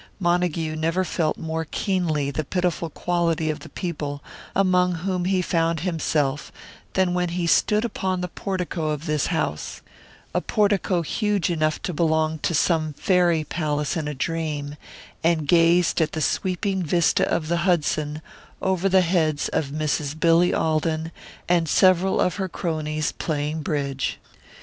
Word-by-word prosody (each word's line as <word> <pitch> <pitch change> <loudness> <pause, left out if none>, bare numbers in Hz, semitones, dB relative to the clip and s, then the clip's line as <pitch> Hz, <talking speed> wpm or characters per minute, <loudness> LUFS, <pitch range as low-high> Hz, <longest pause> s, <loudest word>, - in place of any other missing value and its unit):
Montague 175 -3 0
never 165 +4 0
felt 160 -3 -1
more 160 0 -3
keenly 160 -6 -1
the 155 +3 -2
pitiful 175 0 -1
quality 170 -2 0
of 155 - -6
the - - -11
people 145 -5 -4 0.3
among 180 -2 +3
whom 180 +1 -2
he 185 -1 +1
found 165 -2 0
himself 150 -5 -1 0.4
than 185 -2 +2
when 180 -1 0
he 175 0 -2
stood 210 +6 +3
upon 190 -5 -2
the 180 - -2
portico 180 -4 -3
of 150 +1 -3
this 150 -3 0
house 75 - -3 0.5
a - - +1
portico 200 -4 +1
huge 205 +1 0
enough 155 -2 0
to 180 - -2
belong 160 0 +1
to 170 - -1
some 155 -1 +1
fairy 175 -1 +2
palace 150 -2 -2
in 160 -3 -2
a 150 - -4
dream 150 -1 -3 0.5
and 160 -3 +2
gazed 170 +1 +4
at 160 -1 0
the 160 - -2
sweeping 190 +4 0
vista 170 0 +2
of 155 - 0
the 170 +1 +1
Hudson 155 -3 0 0.4
over 190 0 +1
the 190 0 +5
heads 165 -4 +1
of 155 - 0
Mrs. 150 0 -2
Billy 170 +2 +4
Alden 160 0 0 0.4
and 170 -2 +2
several 185 +2 +4
of 180 +1 +1
her 190 -2 -2
cronies, 155 -3 -2
playing 155 0 -2
bridge. 140 -3 -2
165 Hz, 150 wpm, -24 LUFS, 155-180 Hz, 0.5 s, the